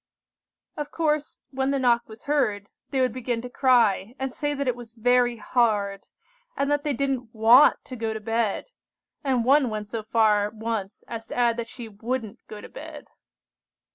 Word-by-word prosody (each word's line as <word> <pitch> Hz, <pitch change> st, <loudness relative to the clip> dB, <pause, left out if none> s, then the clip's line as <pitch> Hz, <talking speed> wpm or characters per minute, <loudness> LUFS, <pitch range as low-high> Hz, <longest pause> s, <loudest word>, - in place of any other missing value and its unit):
"Of 295 Hz, -1 st, -4 dB
course, 305 Hz, -2 st, -1 dB
when 265 Hz, 0 st, -1 dB
the 275 Hz, -, +1 dB
knock 240 Hz, -3 st, +2 dB
was 220 Hz, 0 st, -12 dB
heard, 235 Hz, -9 st, 0 dB, 0.2 s
they 265 Hz, -, 0 dB
would 255 Hz, -3 st, +1 dB
begin 245 Hz, -2 st, -2 dB
to 250 Hz, -, -7 dB
cry, 240 Hz, -5 st, +3 dB
and 265 Hz, -1 st, -3 dB
say 290 Hz, 0 st, -1 dB
that 280 Hz, -1 st, -2 dB
it 250 Hz, -, +1 dB
was 235 Hz, -2 st, -11 dB
very 245 Hz, +1 st, +2 dB
hard, 210 Hz, -4 st, 0 dB, 0.5 s
and 280 Hz, +1 st, 0 dB
that 290 Hz, 0 st, +1 dB
they 295 Hz, -2 st, 0 dB
didn't 255 Hz, -3 st, -2 dB
want 230 Hz, +5 st, +6 dB
to 255 Hz, -, -7 dB
go 225 Hz, -2 st, -2 dB
to 220 Hz, -, -4 dB
bed, 225 Hz, -, -1 dB, 0.5 s
and 255 Hz, -4 st, +1 dB
one 275 Hz, -1 st, +4 dB
went 215 Hz, -1 st, -4 dB
so 225 Hz, +1 st, -4 dB
far 215 Hz, -2 st, +2 dB
once 220 Hz, -2 st, -4 dB
as 225 Hz, -1 st, -6 dB
to -, -, -7 dB
add 240 Hz, -1 st, +3 dB
that 235 Hz, -1 st, -3 dB
she 235 Hz, 0 st, -8 dB
wouldn't 225 Hz, +1 st, -4 dB
go 210 Hz, -1 st, -9 dB
to -, -, -11 dB
bed. -, -, -10 dB
240 Hz, 185 wpm, -25 LUFS, 220-265 Hz, 0.5 s, want